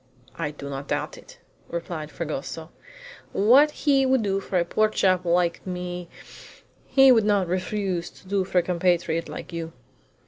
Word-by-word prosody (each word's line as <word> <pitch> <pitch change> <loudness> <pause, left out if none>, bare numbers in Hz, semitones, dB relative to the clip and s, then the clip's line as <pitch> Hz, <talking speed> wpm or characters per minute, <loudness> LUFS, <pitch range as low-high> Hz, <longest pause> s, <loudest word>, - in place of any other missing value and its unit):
"I 165 -3 -2
do 145 -1 -9
not 140 0 -6
doubt - - -2
it," - - -15 0.3
replied 170 -2 -5
Fragoso. 160 +1 -5 0.6
"What 255 +9 +6 0.2
he 275 -2 +4
would 260 -3 +2
do 195 -1 0
for 195 -1 -2
a 170 - +2
poor 215 +5 +2
chap 185 -3 +1
like 175 0 +1
me 180 -1 -5 0.8
he 270 -1 +6
would 225 -3 +5
not 205 -3 +2
refuse 185 -1 -2
to - - -19
do 195 0 +1
for 185 - -3
a 175 - +5
compatriot 170 -2 0
like - - -8
you." 165 -1 -5
180 Hz, 165 wpm, -25 LUFS, 170-200 Hz, 0.8 s, What